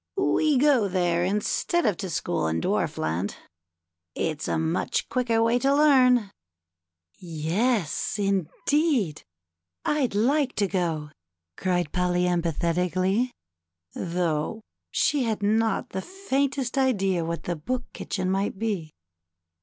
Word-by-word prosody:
We 310 -6 +2
go 260 -6 +4
there 175 -2 +1
instead 210 - 0
of 210 -5 +2
to 190 - -4
school 85 - -1
in 80 +1 0
Dwarfland; 80 +3 -1 0.8
it's 155 -2 -2
a - - 0
much 160 +2 -1
quicker 235 -3 +1
way 230 +2 +3
to 275 +2 +2
learn." 255 -7 +5 0.4
" 85 0 -43
Yes, 175 - -1
indeed, 200 - 0 0.6
I'd 275 -8 +1
like 265 +5 +2
to 205 - +2
go," 165 -6 -2 0.4
cried 180 -4 -1
Polly 180 0 +1
emphati 170 0 0
cally, 190 +7 +1 0.6
though 170 +3 -2 0.3
she 285 -4 +1
had 220 -2 -2
not 220 +1 +1
the 190 - -4
faintest 280 - -1
idea 195 -9 +1
what 170 0 -4
the 175 - -2
Book 245 +11 -3
Kitchen 185 -1 -3
might 195 +1 -1
be. 190 -8 -3
195 Hz, 120 wpm, -26 LUFS, 170-250 Hz, 0.8 s, learn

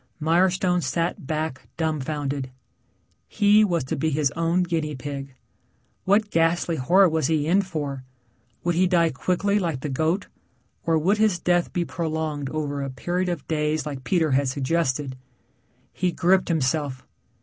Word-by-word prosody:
Mirestone 180 +3 +2
sat 165 0 -2
back 155 -3 -3
dumbfounded. 145 -3 -2 0.8
He 210 0 +4
was 170 -7 +1
to 130 - -3
be 160 +4 0
his 145 -2 +1
own 165 +3 +1
guinea 160 -4 -2
pig. 135 0 -6 0.7
What 205 +2 +2
ghastly 165 0 +1
horror 185 +9 +5
was 160 -1 0
he 155 -2 +1
in 185 +5 +3
for? 145 -8 -4 0.6
Would 175 - +1
he 180 +2 +3
die 170 -3 +3
quickly 190 +8 0
like 165 -8 -2
the 150 - -3
goat 160 +8 0 0.6
or 165 -1 +3
would 190 +7 +2
his 215 -5 +3
death 175 0 +1
be 175 -1 -1
prolonged 155 -4 -3
over 145 -2 -3
a 135 - -3
period 175 +8 -2
of 170 -5 -4
days 155 0 0
like 140 -3 -6
Peter 160 -1 +1
had 135 +1 +2
suggested. 135 0 -1 0.8
He 180 -1 0
gripped 185 +2 +2
himself. 145 -4 -1
160 Hz, 150 wpm, -24 LUFS, 145-175 Hz, 0.8 s, horror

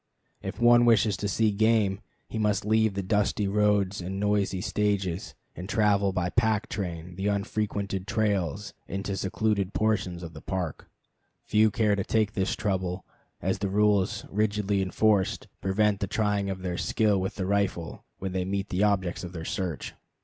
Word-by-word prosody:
If - - -6
one 120 0 +6
wishes 110 -3 +4
to 105 - -2
see 110 +2 +2
game 105 -2 +2 0.3
he 110 - -4
must 105 -2 +1
leave 110 -1 +2
the 100 - -2
dusty 105 +1 +1
roads 100 -1 +2
and 95 +2 -4
noisy 105 -2 +1
stages, 100 -3 -1 0.2
and 90 +3 -7
travel 100 -2 +3
by 90 -1 -1
pack 110 -2 +1
train 90 -2 -5
the 95 +1 -1
unfrequented 100 -1 -2
trails 105 -3 -1
into 100 +1 -4
the 95 - -2
secluded 100 0 -1
portions 95 -5 0
of 85 -1 -7
the 75 - -10
Park. 90 -6 -4 0.5
Few 110 +1 +4
care 105 -2 +2
to 100 - -1
take 110 0 +1
this 95 -2 0
trouble, 95 -2 -2 0.4
as 95 +1 0
the 100 -1 -1
rules, 105 0 +2
rigidly 105 -1 +1
enforced, 100 +1 +1
prevent 100 +1 +2
the 100 - -1
trying 105 -1 0
of 95 -1 -5
their 90 -1 -2
skill 105 -3 +2
with 95 - -3
the 95 - -2
rifle, 100 -4 -1
when 95 -1 -4
they 95 0 -1
meet 100 +1 -2
the 90 +3 +1
objects 95 -4 +1
of 90 0 -7
their 80 -2 -6
search. 90 -6 -3
100 Hz, 170 wpm, -27 LUFS, 95-105 Hz, 0.5 s, one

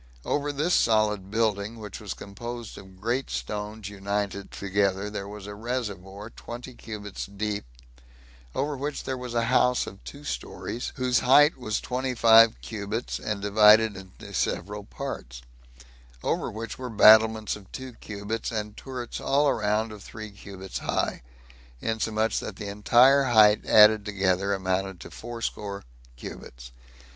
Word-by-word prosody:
Over 145 0 0
this 150 +5 0
solid 105 -3 +2
building, 110 0 0
which 105 -3 -8
was 105 -3 -6
composed 120 +3 -7
of 95 -1 -13
great 120 +6 -1
stones 105 0 -4
united 100 0 -3
together, 100 0 -1
there 100 -1 -5
was 105 -1 -9
a 105 - -7
reservoir 105 -3 -5
twenty 120 +2 -9
cubits 105 -4 -7
deep, 100 -1 -3 0.9
over 145 +2 -1
which 145 +2 -4
there 130 - -3
was 125 -2 -6
a 115 - +2
house 125 +1 +3
of 95 - -11
two 145 +1 -10
stories, 125 -4 -5
whose 125 -1 +2
height 145 +4 +6
was 110 -4 -2
twenty 130 0 -3
five 115 -1 +7
cubits, 110 +2 -4
and 105 -2 -3
divided 105 +1 +6
into 95 -1 -11
several 105 +3 -2
parts; 65 - -7 0.8
over - - -1
which 115 +3 -6
were 130 -1 -5
battlements 110 0 +6
of 100 -2 -14
two 130 -1 -7
cubits, 105 +1 -5
and 105 -2 -4
turrets 125 -3 -6
all 140 +1 +3
round 110 +1 0
of 105 -2 -10
three 110 0 -9
cubits 95 -2 -8
high, - - -1 0.6
insomuch 110 - 0
that - - -6
the - - -7
entire 125 +7 +5
height 110 -3 +5
added 105 0 +7
together 100 -1 0
amounted 95 -1 -1
to - - -10
fourscore 110 -4 -5 0.3
cubits. - - -10
110 Hz, 145 wpm, -26 LUFS, 100-120 Hz, 0.9 s, five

